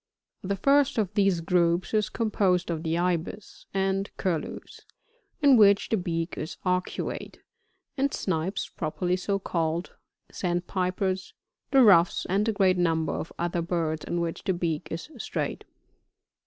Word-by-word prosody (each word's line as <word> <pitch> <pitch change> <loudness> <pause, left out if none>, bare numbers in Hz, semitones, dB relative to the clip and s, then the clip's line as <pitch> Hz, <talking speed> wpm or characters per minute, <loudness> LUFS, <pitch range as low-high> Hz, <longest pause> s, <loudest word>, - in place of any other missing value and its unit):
46 190 - -7
The 200 -1 -2
first 280 -2 +4
of 210 -3 0
these 195 -4 +2
groups 170 +2 +1
is 215 -1 +2
composed 195 -6 +1
of 160 -2 -3
the 165 0 -1
Ibis 180 +3 -3
and 195 0 0
Curlews, 170 -5 -3 0.6
in 275 -3 +7
which 200 -2 +5
the 220 - +2
beak 165 -2 -2
is 155 - -5
arctiate, 180 0 -2 0.6
and 275 +1 +1
Snipes 185 +2 -2
properly 175 +3 -2
so 195 +2 -1
called. 170 -2 -2 0.4
Sandpipers, 185 +1 -2 0.3
the 270 -2 +6
Ruffs, 180 -6 +5
and 205 +4 +1
a - - +3
great 190 -3 +2
number 165 -2 +1
of - - -4
other 175 0 -1
birds 165 -2 -1
in 175 - -2
which 165 -1 -3
the 190 - +1
beak 165 -3 -2
is 165 - -6
straight. - - -3
180 Hz, 145 wpm, -27 LUFS, 170-200 Hz, 0.6 s, in